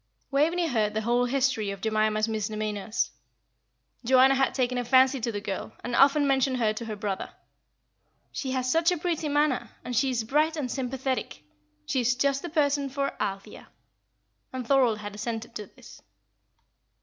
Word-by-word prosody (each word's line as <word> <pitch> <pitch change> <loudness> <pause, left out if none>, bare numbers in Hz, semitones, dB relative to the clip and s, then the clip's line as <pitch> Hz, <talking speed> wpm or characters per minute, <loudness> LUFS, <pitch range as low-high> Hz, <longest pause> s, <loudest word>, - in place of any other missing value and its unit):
Waveney 330 +5 +2
heard 215 -6 0
the 220 - 0
whole 240 +2 +2
history 255 -5 0
of 200 0 -5
Jemima's 215 +1 +1
misdemeanours. 215 0 -2 0.9
Joanna 260 +2 +5
had 270 0 +1
taken 250 -1 0
a - - -1
fancy 260 +1 +4
to 235 +1 -1
the 205 - -3
girl, 200 -2 -5
and 240 0 -3
often 285 +2 +5
mentioned 265 -1 +2
her 220 -3 +1
to 230 +2 -6
her 220 -1 -4
brother. 200 -2 -4 1.0
"She 270 - -4
has 255 -1 -1
such 330 +3 +3
a 355 - 0
pretty 330 -2 -2
manner, 290 -5 +1 0.2
and 250 - -4
she 265 +4 +2
is 240 -3 -1
bright 305 +7 +1
and 260 -5 -3
sympathetic. 260 - -3 0.4
She 260 - 0
is 245 +1 +2
just 275 +1 +1
the 345 - -5
person 285 -3 +1
for 275 +1 -2
Althea;" 195 0 -5 0.8
and 255 -1 -5
Thorold 255 -6 +3
had 205 -1 -7
assented 225 +2 -5
to 210 -3 -6
this. - - -16
250 Hz, 170 wpm, -27 LUFS, 220-275 Hz, 1.0 s, Joanna